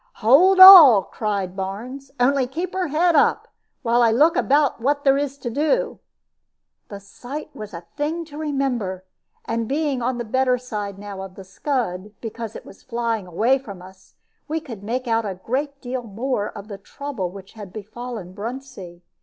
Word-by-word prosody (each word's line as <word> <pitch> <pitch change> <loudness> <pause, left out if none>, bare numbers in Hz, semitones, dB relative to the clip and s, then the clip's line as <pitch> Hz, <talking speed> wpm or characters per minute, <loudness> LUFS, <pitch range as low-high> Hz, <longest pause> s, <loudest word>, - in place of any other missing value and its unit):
"Hold 335 - +5
all!" 330 - +11
cried 200 -4 -3
Barnes; 230 +8 -6
"only 265 +1 +2
keep 335 +8 -5
her 370 -2 -1
head 330 +3 +2
up, 290 - +2 0.4
while 235 0 +2
I 235 - +5
look 300 +9 +3
about 285 -5 +2
what 285 +3 0
there 270 -1 +4
is 280 -1 -2
to 240 -4 -5
do." 315 - 0 0.9
The 200 - -9
sight 255 +10 -9
was 215 -1 -8
a 170 -2 -9
thing 320 +3 -2
to 295 -2 -12
remember; 250 -11 -2 0.4
and 230 0 -2
being 285 -1 -1
on 245 +1 -1
the 240 - -4
better 255 +2 +1
side 210 -5 -6
now 200 -1 -8
of 190 -1 -9
the 195 - -10
scud, 200 -2 -3
because 225 -1 -7
it - - -9
was - - -15
flying 230 -4 -3
away 225 +10 +1
from 200 -8 -10
us, 190 +1 -16 0.3
we 320 +1 -2
could 235 -10 -10
make 245 +5 -4
out 225 0 +1
a 200 -3 -4
great 275 +9 -4
deal 255 0 -4
more 225 0 -3
of 205 0 -10
the 200 -2 -8
trouble 245 -3 -6
which 195 +1 -12
had 205 -4 -10
befallen 220 -2 -8
Bruntsea. 210 -5 -8
240 Hz, 180 wpm, -22 LUFS, 200-280 Hz, 0.9 s, all